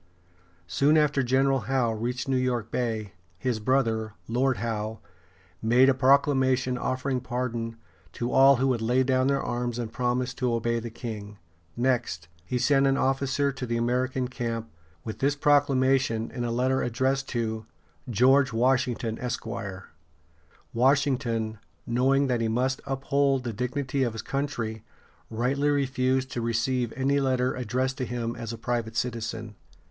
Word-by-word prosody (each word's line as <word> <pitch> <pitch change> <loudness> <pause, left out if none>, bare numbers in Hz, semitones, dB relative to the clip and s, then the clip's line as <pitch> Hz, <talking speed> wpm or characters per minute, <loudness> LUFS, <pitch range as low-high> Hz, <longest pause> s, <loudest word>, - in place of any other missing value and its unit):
Soon 140 - +3
after 150 -2 +3
General 135 +2 +2
Howe 130 -4 +2
reached 120 +4 -3
New 135 - +1
York 125 -3 -1
Bay, 110 -5 -2 0.2
his 120 +2 -1
brother, 110 -3 0
Lord 125 +2 +1
Howe, 110 -2 -3 0.6
made 125 +4 +5
a - - +5
proclamation 130 -1 +3
offering 130 +1 -1
pardon 120 -2 -3 0.4
to 120 +1 -3
all 135 +1 +7
who 135 +2 +1
would 120 -3 0
lay 125 +3 +2
down 130 0 +2
their 140 0 +1
arms 120 -1 -2
and 115 -2 -4
promise 125 +1 -1
to 125 -1 -1
obey 115 0 0
the 115 +1 -6
king. 105 -3 -7 0.4
Next, 120 -9 0 0.2
he 110 +8 -2
sent 135 +2 +3
an 135 0 +2
officer 135 +1 +1
to 135 -2 -6
the 115 0 -1
American 125 +2 0
camp, 115 -3 -4 0.3
with 110 -2 -6
this 140 +3 +2
proclamation 135 -5 +2
in 120 - -4
a 120 - -1
letter 130 +3 +1
addressed 130 +3 0
to 110 -2 -3 0.4
"George 130 +4 +4
Washington, 120 -1 +1
Esq." 125 -1 -3 1.3
Washington, 125 -4 +1 0.3
knowing 135 +4 +2
that 125 -3 0
he 115 - +1
must 125 +4 0
uphold 135 0 +1
the 120 -2 -3
dignity 130 +4 -2
of 120 -4 +1
his 115 - -6
country, 120 -6 -3 0.5
rightly 135 +6 0
refused 130 -2 +1
to 120 - -3
receive 120 +1 0
any 140 +2 +1
letter 130 -2 +1
addressed 130 +3 -2
to 130 - -1
him 120 -1 -3
as 115 -1 -5
a 115 - -6
private 115 -1 -2
citizen. 115 -2 -3
125 Hz, 150 wpm, -27 LUFS, 115-135 Hz, 1.3 s, all